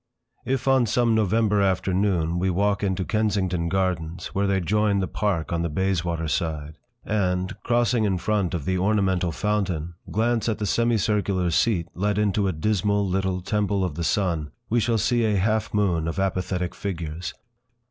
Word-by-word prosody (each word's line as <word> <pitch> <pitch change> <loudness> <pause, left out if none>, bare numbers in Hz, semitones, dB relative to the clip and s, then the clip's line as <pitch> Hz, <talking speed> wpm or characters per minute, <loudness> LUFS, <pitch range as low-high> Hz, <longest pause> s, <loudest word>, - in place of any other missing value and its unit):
If, 130 -1 -1
on 130 -3 +4
some 115 +1 +2
November 110 -1 +2
afternoon, 95 -3 +1
we 95 +1 +1
walk 100 +2 +1
into 95 -2 -1
Kensington 95 -6 0
Gardens, 90 -3 -2
where 100 +1 +1
they 95 -1 +2
join 105 +3 +1
the 95 - -1
Park 90 -7 -1
on 85 - 0
the 85 - -1
Bayswater 85 -1 -1
side, 75 -1 -3 0.3
and, 95 -3 0
crossing 120 -1 +2
in 95 -3 +1
front 95 -2 0
of 75 -5 -4
the 95 -1 0
ornamental 95 -3 +1
fountain, 90 -4 -1 0.2
glance 115 +1 +1
at 110 - -1
the 105 - -2
semicircular 105 -4 +1
seat 85 0 +1
let 100 +2 -1
into 105 -1 +1
a - - +1
dismal 100 +4 0
little 95 0 -1
Temple 100 0 0
of 90 -4 -1
the 85 - -4
Sun, 85 -5 0 0.2
we 120 - +3
shall 115 +1 +1
see 120 +3 +1
a 110 -2 +2
half 110 +3 0
moon 90 -6 +1
of 80 - -3
apathetic 90 -1 -1
figures. 85 -3 -5
95 Hz, 170 wpm, -24 LUFS, 90-105 Hz, 0.3 s, on